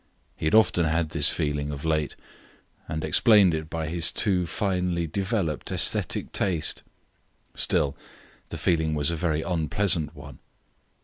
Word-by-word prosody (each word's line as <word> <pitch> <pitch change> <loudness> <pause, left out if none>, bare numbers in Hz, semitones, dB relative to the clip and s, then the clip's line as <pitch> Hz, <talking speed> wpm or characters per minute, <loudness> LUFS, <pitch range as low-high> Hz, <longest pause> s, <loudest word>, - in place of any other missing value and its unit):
He - - -6
had 80 - +2
often 90 -6 +4
had 80 0 0
this 75 -2 +4
feeling, 75 -2 -2
of 70 +1 -7
late, 80 -2 0 0.7
and 80 0 -4
explained 95 +3 +4
it 80 0 -4
by 80 -1 -3
his 85 +1 0
too 90 -4 +1
finely 90 -2 -1
developed 95 - -2
aesthetic - - 0
taste; 85 -6 -1 0.7
still, 70 -1 +1 0.5
the - - -6
feeling 80 -2 +1
was 75 +2 +1
a - - -2
very 80 -2 -1
unpleasant 85 -2 0
one. 70 -3 -12
80 Hz, 140 wpm, -25 LUFS, 75-90 Hz, 0.7 s, often